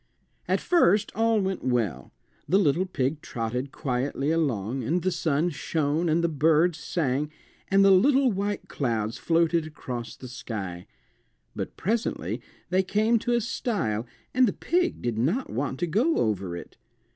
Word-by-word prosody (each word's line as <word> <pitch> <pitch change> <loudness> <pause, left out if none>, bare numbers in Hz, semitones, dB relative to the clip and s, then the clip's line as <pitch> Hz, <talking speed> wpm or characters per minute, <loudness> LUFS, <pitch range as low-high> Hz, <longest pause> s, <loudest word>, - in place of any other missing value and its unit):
At - - +2
first 210 - +3
all 225 0 +2
went 190 -1 -2
well. 110 - -1 0.4
The 190 - +5
little 180 0 +2
pig 145 -3 -1
trotted 125 -1 -3
quietly 135 +2 -1
along, 130 -6 0
and 165 +8 0
the 185 - +1
sun 165 0 0
shone, 155 +2 0
and 165 +2 +2
the - - +4
birds 160 +1 +3
sang, 145 -1 -1 0.4
and 195 0 +4
the 195 - +7
little 260 +6 +5
white 200 +1 -2
clouds 115 -5 -2
floated 165 -1 +2
across 120 -6 -6
the 130 - -10
sky. 100 -8 -6 0.7
But - - -5
presently 220 +5 -1 0.3
they 185 +1 +4
came 215 +5 +2
to 240 +2 -1
a 240 - +2
stile, 145 - -2 0.3
and 255 0 +5
the 200 - 0
pig 355 +1 0
did 120 -2 -1
not 180 - 0
want 130 +2 -2
to - - +3
go 230 - +2
over 95 -5 -1
it. - - -11
160 Hz, 155 wpm, -26 LUFS, 125-195 Hz, 0.7 s, the